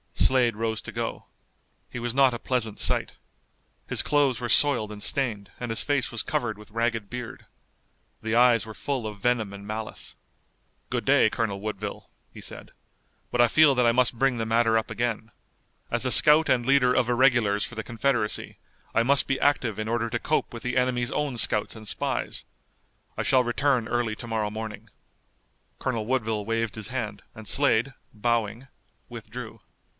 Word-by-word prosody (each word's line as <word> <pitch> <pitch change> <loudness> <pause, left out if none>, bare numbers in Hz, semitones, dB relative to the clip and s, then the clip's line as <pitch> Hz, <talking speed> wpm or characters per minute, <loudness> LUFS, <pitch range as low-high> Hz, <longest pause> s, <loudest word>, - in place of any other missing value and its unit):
Slade 125 -4 +3
rose 110 0 -2
to - - -8
go. - - -4 0.6
He 125 - -6
was 120 0 -3
not 135 -2 +5
a 120 - -4
pleasant 115 -5 -2
sight. - - -1 0.7
His - - +3
clothes 140 -5 +2
were 120 - -3
soiled 125 -5 +4
and 105 -1 -8
stained, 110 -8 -2
and 120 - -4
his 115 - +2
face 145 -3 +1
was 120 - -1
covered 110 -4 -2
with 105 +1 -15
ragged 115 -2 -1
beard. 125 -2 -7 0.8
The 110 0 -2
eyes 120 -1 +5
were 110 - -8
full 130 0 -3
of 105 -1 -6
venom 115 -2 0
and 100 0 -10
malice. 110 0 -5 0.7
"Good - - -2
day, - - +4
Colonel 105 -4 -2
Woodville," 105 0 -6 0.2
he - - -12
said, - - -7 0.6
"but 120 - +2
I 120 - +5
feel 150 +1 +5
that 125 -1 +3
I 115 - +5
must 125 0 +2
bring 135 0 +2
the 115 - -2
matter 115 0 +3
up 110 - -2
again. 115 -2 -3 0.6
As - - 0
a - - +1
scout 155 +1 +5
and 120 -2 +2
leader 130 -2 +4
of 125 -2 +2
irregulars 120 -5 +3
for 120 - -8
the 110 - -4
Confederacy. 115 -2 -1 0.4
I 115 - +4
must 140 +3 +3
be 135 - +1
active 125 -7 +1
in 110 0 -3
order 115 0 0
to 120 - -1
cope 150 +3 -1
with 115 - -7
the 125 0 -1
enemy's 125 -1 +1
own 145 -4 -2
scouts 105 -1 +2
and 110 -1 -11
spies. 95 -2 -2 0.7
I - - -1
shall 130 -2 +4
return 125 0 +1
early 120 -2 0
to 120 - -9
morrow 110 -2 -1
morning." 110 0 -7 0.9
Colonel 115 -4 -2
Woodville 110 -4 -1
waved 115 -1 -1
his 110 - -3
hand 115 -5 -4
and 110 -1 -10
Slade, 135 -1 +2 0.2
bowing, 115 +2 -1 0.4
withdrew. - - -8
115 Hz, 180 wpm, -26 LUFS, 110-125 Hz, 0.9 s, not